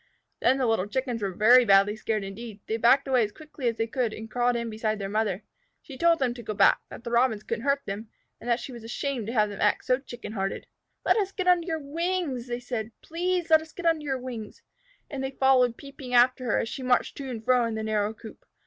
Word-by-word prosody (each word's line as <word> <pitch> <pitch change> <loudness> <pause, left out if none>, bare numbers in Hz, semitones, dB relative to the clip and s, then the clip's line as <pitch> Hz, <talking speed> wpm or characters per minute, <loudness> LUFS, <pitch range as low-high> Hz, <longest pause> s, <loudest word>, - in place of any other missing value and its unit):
Then 260 +3 +3
the 265 - +1
little 225 -4 +1
Chickens 245 0 -2
were 200 - 0
very 235 +7 +6
badly 200 -1 +4
scared 215 -1 -2
indeed. 205 +2 -8
They 220 - -2
backed 260 +5 +4
away 255 -3 +3
as 210 - -3
quickly 295 0 -6
as 230 -1 0
they 225 - +1
could, 230 -1 -1
and 220 0 -9
crawled 245 0 +1
in 235 0 -2
beside 220 -1 -2
their 200 -1 -4
mother. 210 -2 -1 0.4
She 275 - -10
told 335 +4 +4
them 260 -4 0
to 240 - -9
go 215 -2 -5
back; - - +5
that - - -10
the 235 - -5
Robins 235 -3 +2
couldn't 230 +3 -4
hurt 280 0 +1
them, 210 +2 -6 0.3
and 245 - -7
that 235 0 +2
she 260 - -7
was 235 -2 -10
ashamed 240 0 -3
to 230 - -3
have 215 -3 +3
them 205 - -7
act 210 - +2
so 255 0 +2
Chicken 240 -5 -9
hearted. 195 -3 -3 0.4
"Let - - +4
us 395 -3 0
get 370 -2 -3
under 355 -1 +4
your 325 -2 -1
wings!" 310 -3 -2
they 240 0 -3
said. 240 -3 -4
"Please 350 0 -2
let 315 0 +7
us 315 0 -13
get 355 - -8
under 325 -2 +2
your 270 -2 -1
wings!" 240 -4 -8 0.4
And 270 -2 -5
they 265 - -1
followed, 260 -3 +3
peeping, 275 -3 -6
after 250 +1 +4
her, 240 - +1
as - - -1
she 265 - -6
marched 250 -1 +1
to 275 -2 -6
and 225 -3 -6
fro 250 -1 +4
in 230 -1 -3
the 220 - -3
narrow 215 -1 0
coop. 220 0 -12
240 Hz, 250 wpm, -27 LUFS, 220-270 Hz, 0.4 s, let